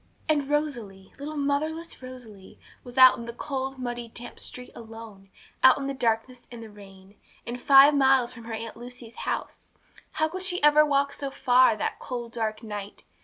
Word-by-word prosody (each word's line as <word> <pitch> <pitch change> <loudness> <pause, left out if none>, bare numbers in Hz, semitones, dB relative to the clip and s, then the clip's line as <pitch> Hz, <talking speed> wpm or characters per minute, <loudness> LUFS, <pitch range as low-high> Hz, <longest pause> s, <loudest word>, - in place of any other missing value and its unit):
And 290 -3 +1
Rosalie, 240 -11 -3
little 300 +2 -6
motherless 310 +4 -2
Rosalie, 235 -7 -12 0.3
was 245 +1 -11
out 255 -1 +8
in 235 - -7
the 235 - -6
cold, 270 +1 -4
muddy, 240 -2 -5
damp 240 +1 -8
street 250 0 -6
alone, 225 -4 -12 0.3
out 260 -1 +7
in 275 - -4
the 275 - -2
darkness 245 0 -2
and 235 -1 -9
the 220 - -11
rain, 195 -1 -16 0.3
and 245 +1 -6
five 275 +1 +7
miles 265 -3 +3
from 235 -2 -12
her 230 - -6
Aunt 225 0 -6
Lucy's 240 -1 -10 0.2
house! - - -5 0.4
How 315 - +1
could 370 +4 -6
she 365 -1 +1
ever 295 +1 +7
walk 280 -1 +1
so 280 - -4
far, 255 -3 +4
that 215 - -3
cold, 240 -3 -6
dark 220 -1 -3
night? 205 -2 -7
250 Hz, 180 wpm, -26 LUFS, 225-280 Hz, 0.4 s, out